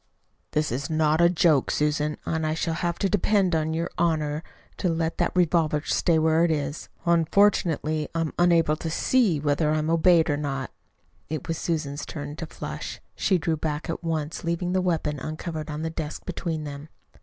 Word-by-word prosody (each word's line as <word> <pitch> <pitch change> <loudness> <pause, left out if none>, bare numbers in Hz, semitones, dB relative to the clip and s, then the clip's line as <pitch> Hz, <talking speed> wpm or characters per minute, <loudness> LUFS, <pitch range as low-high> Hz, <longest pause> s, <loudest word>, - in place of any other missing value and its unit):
"This 150 -3 +1
is 135 +3 -3
not 155 0 +2
a 170 - +6
joke, 165 -5 +3
Susan, 150 0 0
and 160 -1 -1
I 155 0 0
shall 165 0 -1
have 170 +1 -1
to 200 - +1
depend 200 -2 +2
on 160 -1 +1
your 170 +1 -2
honor 155 -3 +1 0.4
to 180 - 0
let 165 0 -1
that - - +2
revolver 165 -4 +2
stay 170 -2 +2
where 160 +1 +3
it 170 - +3
is. 150 -1 -2 0.2
Unfortunately 165 -3 +2
I 165 - +1
am 160 - -2
unable 170 -3 +4
to 160 - -4
SEE 200 - +2
whether 150 +1 +1
I 155 - +2
am 155 +1 0
obeyed 165 0 +5
or 145 - +1
not." 135 -3 -3 0.6
It 155 -3 -4
was 165 -1 -2
Susan's 150 -4 -2
turn 145 -1 -6
to 165 - -5
flush. - - -6
She 190 - +2
drew 160 0 -1
back 150 +1 -3
at 165 - -5
once, 160 -2 -2
leaving 170 +1 -1
the 185 - +2
weapon 160 -5 -1
uncovered 155 +2 -5
on 150 +1 -4
the 160 - -2
desk 155 -2 -5
between 170 -3 -3
them. 145 +1 -7
160 Hz, 190 wpm, -25 LUFS, 150-170 Hz, 0.6 s, a